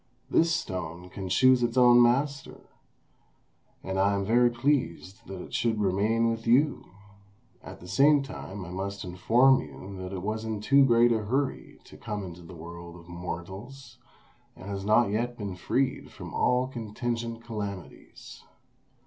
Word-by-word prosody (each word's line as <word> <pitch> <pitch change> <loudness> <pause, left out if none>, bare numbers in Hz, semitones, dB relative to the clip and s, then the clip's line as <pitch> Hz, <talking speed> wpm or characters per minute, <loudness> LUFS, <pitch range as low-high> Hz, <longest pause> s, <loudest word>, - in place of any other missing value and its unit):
This 165 +1 +3
stone 90 -1 -5
can 95 -1 -6
choose 130 +6 +5
its 120 +1 0
own 120 -1 +7
master, 140 +4 +1 1.2
and 95 0 -3
I 100 +1 +3
am 100 0 -1
very 120 +3 +4
pleased 120 - -2
that 95 -2 -7
it - - -13
should 115 -4 0
remain 105 +4 +1
with 115 0 -5
you; 135 +4 +3 0.8
at - - -11
the 90 - -12
same 145 +6 +4
time 105 -7 -8
I 85 - -9
must 100 +2 -4
inform 115 +9 +3
you 80 +7 -10
that 90 0 -6
it 95 -2 -5
was 110 +2 -3
in 110 -2 -3
too 140 +6 +5
great 120 -1 +4
a 115 - +2
hurry 135 +5 -2
to - - -15
come 105 -2 -5
into 90 -1 -9
the 85 +1 -12
world 85 +1 -10
of 85 -1 -14
mortals, 95 +9 -8 0.6
and 95 +2 -9
has 100 -1 -4
not 110 +1 +3
yet 120 +3 -2
been 100 -4 -5
freed 130 +8 -1
from - - -10
all 125 +1 +2
contingent 115 -1 -4
calamities. 100 -6 -8
110 Hz, 160 wpm, -27 LUFS, 95-120 Hz, 1.2 s, own